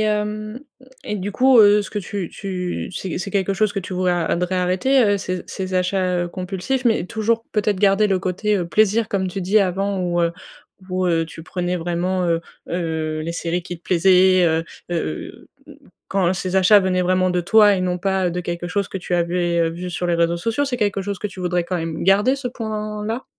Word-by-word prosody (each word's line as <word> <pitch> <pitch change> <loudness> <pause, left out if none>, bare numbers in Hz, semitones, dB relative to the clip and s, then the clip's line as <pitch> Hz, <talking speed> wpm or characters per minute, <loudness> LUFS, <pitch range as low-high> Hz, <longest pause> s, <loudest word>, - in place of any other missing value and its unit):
hem 215 +1 -2 0.5
et 210 - -3
du 200 +1 -4
coup, 260 +2 +5
heu, 205 0 +6
ce 200 - -9
que 210 - -3
tu 195 -2 -5
tu 180 -3 -4
c'est 185 -2 -4
c'est 195 +1 -4
quelque 195 0 0
chose 215 +1 0
que - - -1
tu 185 0 -6
vous 185 0 -1
a 175 -1 +2
voudrais 180 +3 -1
arrêter, 185 +9 +2
heu, 205 -1 +2
ces 185 -1 -4
ces 185 -1 -5
achats, 180 -1 +1
heu, - - -5
compulsifs? 190 +8 -3
Mais 225 -6 +2
toujours, 225 +3 -1
peut-être, 210 -1 +1
garder 200 +1 +4
le 190 -2 +1
côté, 195 +3 -1
heu, 175 - -2
plaisir 215 +4 +2
comme 190 -2 0
tu 190 +1 -4
dis 200 +4 +3
avant 195 +1 0
où, 175 -1 0
heu, 170 0 +1 0.6
où, 185 0 -1
heu, 165 -1 +1
tu 160 0 -10
prenais 180 0 -2
vraiment, 175 +2 -1
heu, 165 -1 +1 0.3
heu, 160 -2 -2
les 165 +2 -4
séries 170 +1 -2
qui 175 0 -7
te 165 - -26
plaisaient, 185 +1 +4
heu, 160 0 +1 0.3
heu, 120 - -4 0.2
heu, - - -12 0.3
quand 190 -2 +1
ces 185 0 -2
achats 200 +2 +6
venaient 185 -1 +1
vraiment 185 +1 +2
de 180 -1 0
toi 210 +2 +5
et 185 - -1
non 180 -1 -1
pas, 190 0 0
heu, - - -2
de 180 +1 -3
quelque 175 0 -4
chose 200 +3 -1
que - - -5
tu 180 -1 -6
avais, 175 0 0
heu, 165 -1 +2
vu 175 +2 -6
sur 175 0 -3
les 170 - +1
réseaux 170 0 +1
sociaux, 230 +10 0
c'est 250 -3 -3
quelque 205 -3 0
chose 200 -1 -4
que - - -3
tu 195 -2 -11
voudrais 175 -1 0
quand 180 - -2
même 165 -1 -4
garder 205 +8 +4
ce 270 -2 -4
point-là? 215 0 -4
185 Hz, 225 wpm, -21 LUFS, 175-205 Hz, 0.6 s, heu